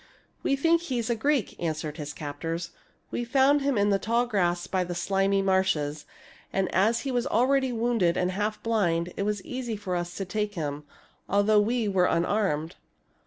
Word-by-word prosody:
" - - -37
We 275 - +1
think 330 +4 +3
he 270 -8 -3
is 235 0 -1
a - - +2
Greek," 275 -1 0
answered 155 -2 -3
his 150 -2 -5
captors. 165 +4 -5 0.2
" - - -39
We 240 - -2
found 270 +4 +3
him 275 -3 +1
in 205 0 +3
the 195 - +2
tall 235 +4 +1
grass 175 -6 0
by 185 -1 0
the 175 0 -5
slimy 195 +1 +1
marshes; 175 -6 0 0.4
and 190 -1 -1
as 220 +5 +3
he 275 - -3
was 245 -1 0
already 260 +3 +2
wounded 225 -7 +1
and 180 0 +1
half 210 +2 -2
blind, 180 -7 0
it - - -3
was 205 -1 -2
easy 250 -3 -4
for 200 -3 -3
us 175 0 -3
to 195 - -3
take 210 +2 -2
him, 150 -3 -4 0.4
although 205 +2 +4
we 230 +1 0
were 190 -3 +3
unarmed." 170 -3 0
200 Hz, 195 wpm, -27 LUFS, 175-235 Hz, 0.4 s, although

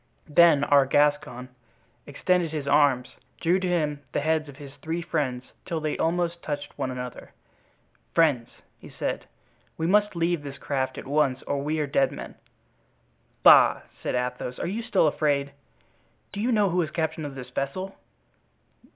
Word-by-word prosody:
Then 150 -2 +6
our 140 -2 +4
Gascon, 145 -3 +1 0.6
extending 175 +4 +1
his 150 -2 -4
arms, 140 -3 +2 0.2
drew 175 +3 +2
to 185 - -2
him 150 -5 0
the - - +1
heads 155 -1 0
of 140 - -12
his 140 -2 -11
three 160 +4 -4
friends 130 -7 -2
till 165 -3 -3
they 155 -1 -2
almost 170 +1 -1
touched 145 -1 -5
one - - -3
another. 125 -1 -7 0.8
"Friends," 140 -8 +3 0.3
he - - -12
said, - - -4 0.5
"we 160 - -2
must 205 +2 +3
leave 170 -1 0
this 140 -1 -8
craft 130 -2 -2
at - - -7
once 140 -2 +1
or 140 - -2
we 155 +2 -1
are 150 - +1
dead 140 -1 +1
men." - - -8 1.1
"Bah!" - - +7 0.2
said - - -2
Athos, 125 0 -3
"are - - -3
you 200 +7 -2
still 230 -7 +2
afraid?" 145 -2 +1 0.8
"Do 200 - -6
you 245 +3 +1
know 205 -5 +3
who 180 +1 +2
is 160 - -2
captain 160 0 -2
of 145 -2 -6
this 125 -1 -9
vessel?" 185 +10 -3
150 Hz, 165 wpm, -26 LUFS, 140-170 Hz, 1.1 s, Bah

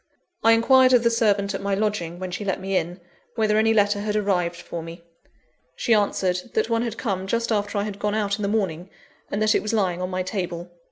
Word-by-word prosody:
I 225 0 +6
inquired 255 +3 +5
of 245 -2 +5
the 235 - +3
servant 205 -3 +1
at 195 - -4
my 200 0 0
lodging, 195 -5 -2
when 185 0 -5
she 185 - -4
let 195 -2 -1
me 195 +1 -3
in, 175 +1 -1 0.4
whether 215 -2 +2
any 220 0 +3
letter 205 -1 +3
had 210 0 -2
arrived 180 -5 0
for 170 -1 -7
me. 165 +1 -10 0.7
She 235 - +1
answered, 190 -3 +1
that 440 - +1
one 230 0 +2
had 235 -2 -3
come 195 -5 -2
just 230 +3 -1
after 205 -1 -1
I 200 - +1
had 205 -1 -6
gone 210 0 -1
out 205 -1 0
in - - -4
the 200 - 0
morning, 190 -4 -1 0.4
and 200 - -2
that 215 - +4
it - - +2
was 215 - -3
lying 185 -5 0
on 180 - -2
my 185 0 -2
table. 180 -2 -4
205 Hz, 235 wpm, -24 LUFS, 185-220 Hz, 0.7 s, I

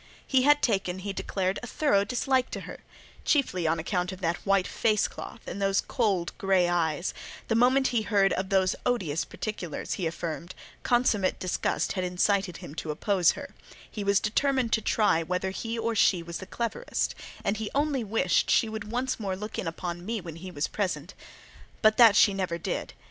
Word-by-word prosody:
He 265 -2 +3
had 290 +2 +4
taken," 195 -5 +1
he 195 +1 -4
declared, 190 -1 -2
"a 245 - -7
thorough 230 -7 +2
dislike 255 +3 0
to - - -5
her, - - -9 0.4
chiefly 185 - +1
on 165 +1 +2
account 180 +2 -1
of 185 - -8
that 170 0 0
white 195 -2 +3
face 215 -2 +1
cloth, - - -9
and 200 - -6
those 195 0 +2
cold 195 -8 0
grey 190 -4 +3
eyes: 175 -1 0 0.4
the - - +2
moment 255 +3 +4
he 240 -3 +1
heard 200 -2 +2
of 190 0 -2
those 190 -2 +2
odious 180 -11 0
particulars," 190 -7 -5
he 180 - -1
affirmed, 170 +2 -5 0.3
"consummate 235 -6 +2
disgust 185 - -1
had 185 - -2
incited 180 0 +1
him - - -9
to 160 - -6
oppose 180 +2 +2
her; 280 -1 -9 0.4
he 210 - -4
was 200 0 +3
determined 255 +2 +1
to 220 - +3
try 210 -6 +2
whether 180 +3 -2
he 225 +4 -4
or 230 0 -1
she 185 -5 +3
was 170 0 -6
the 190 - -8
cleverest, 235 - -2 0.3
and 200 +2 0
he 215 -1 -3
only 285 -3 +1
wished 200 -5 +1
she 225 - +4
would 220 -1 -6
once 255 +1 -1
more 195 -3 -2
look 210 +3 -6
in - - -3
upon 175 +1 -4
me 225 +3 -2
when 165 -3 -8
he 185 +2 -8
was 150 -4 -2
present:" 200 -3 -3 0.7
but 215 0 +5
that 230 -4 +8
she 205 -2 +6
never 185 -3 -2
did. 170 - -4
195 Hz, 190 wpm, -28 LUFS, 180-225 Hz, 0.7 s, that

